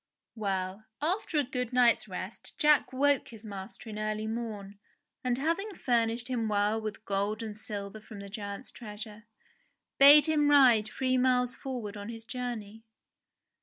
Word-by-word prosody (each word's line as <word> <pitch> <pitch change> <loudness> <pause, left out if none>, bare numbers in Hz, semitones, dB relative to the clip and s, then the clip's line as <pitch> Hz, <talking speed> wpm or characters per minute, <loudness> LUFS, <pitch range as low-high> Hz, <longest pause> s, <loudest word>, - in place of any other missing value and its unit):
Well, 195 -1 -3
after 335 +1 -1
a 295 - +4
good 250 -2 -3
night's 240 -3 +4
rest 185 +2 -7
Jack 300 -2 +4
woke 280 +1 +2
his 225 -1 -12
master 200 +2 -8
in 215 -1 -6
early 215 0 -2
morn, 215 -3 -5 0.4
and 250 -1 0
having 335 +8 -1
furnished 235 -3 +1
him 240 -4 -1
well 210 +1 +1
with 215 0 -6
gold 205 +3 -1
and 215 -2 -6
silver 205 0 -7
from 215 0 -11
the 200 - -8
giant's 200 +2 -7
treasure, 215 -1 -9 0.7
bade 290 +2 +9
him 300 -2 +3
ride 250 -7 +6
three 255 +3 0
miles 250 -1 +2
forward 240 -7 -6
on 205 +2 -7
his 225 -1 -8
journey. 230 -4 -5
225 Hz, 155 wpm, -30 LUFS, 210-255 Hz, 0.7 s, bade